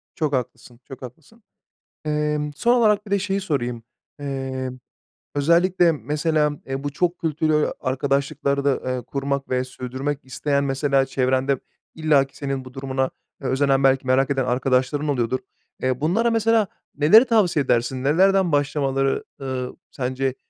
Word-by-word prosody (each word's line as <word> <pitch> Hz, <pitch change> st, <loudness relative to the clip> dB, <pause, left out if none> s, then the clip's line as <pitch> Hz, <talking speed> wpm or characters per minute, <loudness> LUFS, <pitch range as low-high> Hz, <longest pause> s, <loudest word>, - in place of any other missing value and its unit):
Çok 155 Hz, -5 st, -1 dB
haklısın, 120 Hz, -1 st, -4 dB
çok 135 Hz, -, -10 dB
haklısın. 155 Hz, -, -12 dB, 0.6 s
Emm, 150 Hz, 0 st, -1 dB
son 240 Hz, +10 st, +3 dB
olarak, 210 Hz, -3 st, +3 dB
bir 200 Hz, -, -11 dB
de 200 Hz, -, +3 dB
şeyi 195 Hz, 0 st, -1 dB
sorayım. 125 Hz, -10 st, -2 dB, 0.4 s
Eee, 135 Hz, -2 st, -4 dB, 0.6 s
özellikle, 170 Hz, +4 st, +4 dB
mesela, 150 Hz, +2 st, 0 dB
eee, 135 Hz, +1 st, -4 dB
bu 145 Hz, -, -1 dB
çok 175 Hz, +4 st, -1 dB
kültürlü 155 Hz, -2 st, +1 dB
arkadaşlıklarda, 140 Hz, +1 st, 0 dB
eee, 130 Hz, -1 st, -2 dB
kurmak 140 Hz, +2 st, -3 dB
ve 125 Hz, 0 st, +1 dB
sürdürmek 130 Hz, +3 st, -4 dB
isteyen, 140 Hz, +2 st, -1 dB
mesela, 135 Hz, 0 st, +1 dB
çevrende 130 Hz, 0 st, +1 dB, 0.4 s
illaki 145 Hz, -4 st, +2 dB
senin 135 Hz, -2 st, -3 dB
bu 130 Hz, -, -11 dB
durumuna 130 Hz, 0 st, -1 dB, 0.3 s
özenen, 135 Hz, 0 st, +1 dB
belki 135 Hz, 0 st, +3 dB
merak 130 Hz, +2 st, +3 dB
eden 135 Hz, -2 st, 0 dB
arkadaşların 130 Hz, +3 st, +1 dB
oluyordur. 130 Hz, -2 st, 0 dB, 0.4 s
Eee, 130 Hz, 0 st, 0 dB
bunlara, 220 Hz, +10 st, +2 dB
mesela, 225 Hz, -1 st, +3 dB, 0.3 s
neleri 170 Hz, -, +7 dB
tavsiye 195 Hz, -, +2 dB
edersin? 125 Hz, +1 st, 0 dB
Nelerden 185 Hz, +5 st, +3 dB
başlamaları, 135 Hz, -2 st, +1 dB, 0.2 s
ııı, 130 Hz, -2 st, -4 dB, 0.2 s
sence, 130 Hz, 0 st, -2 dB
140 Hz, 135 wpm, -23 LUFS, 130-155 Hz, 0.6 s, neleri